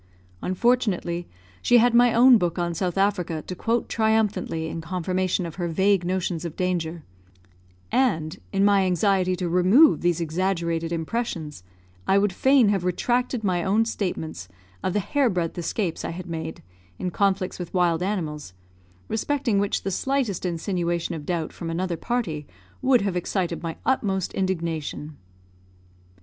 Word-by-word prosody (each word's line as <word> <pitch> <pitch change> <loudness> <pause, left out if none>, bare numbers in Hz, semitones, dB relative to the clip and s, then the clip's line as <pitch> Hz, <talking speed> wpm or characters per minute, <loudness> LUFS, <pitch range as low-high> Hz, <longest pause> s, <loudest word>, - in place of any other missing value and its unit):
Unfortunately, 185 -4 0 0.3
she 245 - +5
had 240 0 +4
my 240 0 +6
own 240 +1 +7
book 175 -2 -1
on 175 -1 -1
South 180 +1 -2
Africa 185 -5 0
to - - -5
quote 230 +6 -1
triumphantly 215 -7 0
in 165 +1 -5
confirmation 185 +2 -1
of 165 0 -7
her 175 -2 -1
vague 190 +3 +2
notions 180 -2 -2
of 170 -2 -5
danger; 170 -3 -2 0.9
and, 190 -10 +1
in 195 0 +2
my 200 -1 +4
anxiety 185 0 +2
to 180 -1 -3
remove 185 - +5
these 175 -1 +1
exaggerated 170 0 -1
impressions, 165 - -3 0.5
I 195 - +4
would 200 -1 +2
fain 260 +1 +4
have 195 -3 +1
retracted 240 +6 0
my 180 -3 +1
own 210 +4 +2
statements 160 - -4 0.4
of 185 - 0
the 210 - +2
hair 270 +6 +1
breadth 175 -4 -2
escapes 175 0 -2
I - - -3
had 175 +1 -6
made, 160 -1 -6 0.3
in 180 - -3
conflicts 195 -1 0
with 180 - -6
wild 175 -2 +2
animals, 155 - -3 0.5
respecting 245 -2 0
which 200 0 0
the 195 - -2
slightest 235 -5 -1
insinuation 175 0 -2
of 150 -3 -7
doubt 170 -3 -2
from 170 - -6
another 175 +1 -1
party 165 -9 -3 0.3
would 255 -2 +4
have 195 -2 -1
excited 180 -1 -2
my 165 -1 -5
utmost 195 -8 0
indignation. 165 -5 -3
185 Hz, 150 wpm, -24 LUFS, 170-205 Hz, 0.9 s, own